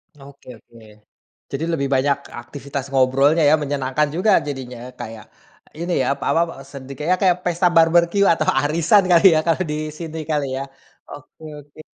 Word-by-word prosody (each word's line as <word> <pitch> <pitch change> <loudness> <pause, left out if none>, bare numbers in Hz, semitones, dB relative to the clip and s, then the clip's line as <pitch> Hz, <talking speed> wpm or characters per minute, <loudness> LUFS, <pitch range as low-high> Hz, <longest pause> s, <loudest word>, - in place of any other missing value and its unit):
Oke 140 -1 -17
oke. 115 +1 -19 0.7
Jadi 140 +3 -4
lebih 140 -4 -1
banyak 140 +1 +1 0.2
aktivitas 140 -1 -7
ngobrolnya 135 +4 +3
ya, 155 - +6
menyenangkan 140 +1 -1
juga 190 +5 +2 0.2
jadinya 130 -4 -6 0.2
kayak 110 -3 -8 0.5
ini 175 +1 -3
ya, - - -2
pa - - -6
apa, 165 0 0 0.2
sedi 135 -1 -10
kayak, 175 +5 +1
kayak 180 -3 +3
pesta 175 +1 +1
barbeque 170 +4 +4
atau 155 -1 -2
arisan 165 +7 +3
kali 170 +2 +5
ya - - +3
kalau 165 +2 +1
di - - -2 0.2
sini 160 -1 -7
kali 150 -2 0
ya. 135 - -3 0.5
Oke 145 +2 -13 0.2
oke. 145 +1 -18
150 Hz, 160 wpm, -20 LUFS, 135-170 Hz, 0.7 s, ya